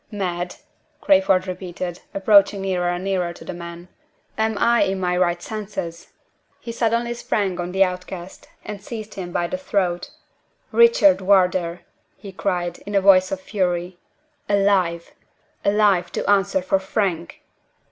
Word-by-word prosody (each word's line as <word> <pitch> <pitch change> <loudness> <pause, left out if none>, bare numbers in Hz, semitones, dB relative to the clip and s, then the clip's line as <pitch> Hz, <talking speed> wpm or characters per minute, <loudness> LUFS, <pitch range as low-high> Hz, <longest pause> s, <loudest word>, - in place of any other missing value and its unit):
"Mad?" 180 -4 -3 0.4
Crayford 280 -11 +3
repeated, 180 -1 -5
approaching 200 0 +4
nearer 180 -2 0
and 175 +1 -3
nearer 185 -3 -1
to - - -13
the - - -5
man. 170 0 -9 0.5
"Am 220 -1 0
I 235 +2 +3
in 190 0 +1
my 180 -1 0
right 175 -1 +1
senses?" 200 -5 -6 0.5
He 235 - -7
suddenly 235 +1 0
sprang 200 -6 -2
on 175 0 -3
the 190 +1 +4
outcast, 180 0 -6 0.2
and 210 -2 -7
seized 215 -1 -7
him 180 -2 -6
by 175 - 0
the 275 +10 -4
throat. 185 -9 -1 0.6
"Richard 465 - +5
Wardour!" 180 -3 +2 0.4
he 200 - -10
cried, 180 -2 -2
in 205 - -4
a - - +6
voice 185 -1 +5
of 190 -1 -3
fury. 180 -3 -2 0.5
"Alive! 195 -4 +1 0.5
alive, 200 -3 +2
to - - -3
answer 195 -2 +2
for 190 +1 +1
Frank!" 190 -3 -2
190 Hz, 145 wpm, -22 LUFS, 175-205 Hz, 0.6 s, a